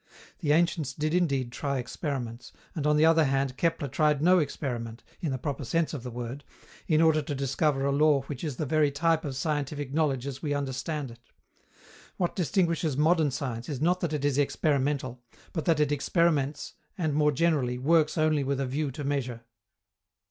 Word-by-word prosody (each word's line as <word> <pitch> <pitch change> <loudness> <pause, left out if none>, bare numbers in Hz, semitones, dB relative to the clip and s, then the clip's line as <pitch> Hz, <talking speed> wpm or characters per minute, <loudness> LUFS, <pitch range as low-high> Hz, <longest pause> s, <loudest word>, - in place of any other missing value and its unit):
The 150 -5 0
ancients 160 -4 +2
did 155 +3 -2
indeed 140 -9 +1
try 140 +2 -2
experiments, 125 -2 -5 0.2
and 150 -3 -2
on 150 0 +3
the 155 - +5
other 165 -1 +5
hand 135 -1 0
Kepler 165 -1 0
tried 150 +2 +2
no 180 +4 +5
experiment, 120 -6 -4 0.2
in 160 -6 -2
the 130 - -1
proper 140 +1 -4
sense 165 +6 0
of 145 - -4
the 125 - -6
word, 120 +3 -6 0.4
in 155 0 +4
order 160 -1 +4
to 145 0 -4
discover 135 +1 0
a 140 - +2
law 145 -1 +3
which 135 0 -7
is 150 -5 -3
the 155 - -2
very 150 +1 +3
type 160 +3 +1
of 140 -3 -4
scientific 145 -1 -2
knowledge 140 -5 +1
as 135 -2 -6
we 145 -2 -1
understand 140 0 -3
it. 115 0 -17 0.9
What 175 -2 -1
distinguishes 170 -5 0
modern 160 0 +3
science 130 -3 -4
is 140 -4 -3
not 175 +5 +2
that 170 -4 -2
it 145 -2 -1
is 145 -1 +1
experimental, 140 -3 0 0.3
but 160 -5 -3
that 165 -3 +3
it 150 -1 +2
experiments 145 -1 0 0.2
and, 160 -5 0
more 150 0 +3
generally, 140 -5 +1
works 155 +4 +2
only 155 -2 +2
with 135 0 -1
a 135 - 0
view 140 +3 -2
to 145 - -6
measure. 130 -4 -2
145 Hz, 190 wpm, -28 LUFS, 135-155 Hz, 0.9 s, the